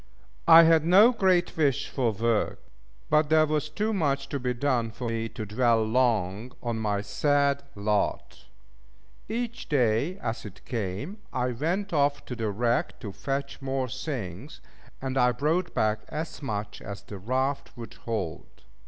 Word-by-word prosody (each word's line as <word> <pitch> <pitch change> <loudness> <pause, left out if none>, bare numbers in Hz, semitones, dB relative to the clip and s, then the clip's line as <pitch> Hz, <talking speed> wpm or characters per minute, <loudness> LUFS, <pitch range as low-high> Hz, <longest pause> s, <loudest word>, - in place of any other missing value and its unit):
I 165 +1 +10
had 165 -1 +5
no 195 +8 +7
great 185 -6 +2
wish 145 -4 +1
for 125 -4 0
work: 115 +1 0 0.5
but 150 0 +4
there 155 0 +5
was 150 0 -1
too 210 +8 -1
much 145 -8 0
to 140 - -2
be 125 0 -1
done 120 -3 0
for 120 +2 -6
me 115 0 -2
to 110 -2 -6
dwell 115 +1 +2
long 110 -1 +1
on 120 -2 -2
my 105 -2 0
sad 140 +6 +1
lot. 105 0 -1 0.8
Each 235 +2 -4
day 135 - +2
as 115 - -4
it 100 -2 -11
came, 115 - -4
I 125 -1 0
went 175 - -2
off 145 -1 +1
to 125 - -5
the 115 -2 -2
wreck 120 +4 0
to 105 -5 -5
fetch 140 +6 -4
more 135 -1 -1
things; 120 - -6 0.4
and 135 0 -1
I 125 0 +5
brought 160 +8 0
back 110 0 +2
as 155 +1 -5
much 105 -6 -4
as 100 -1 -7
the 100 - -9
raft 130 +7 -2
would 115 -1 -8
hold. 100 - -5
130 Hz, 160 wpm, -27 LUFS, 110-150 Hz, 0.8 s, I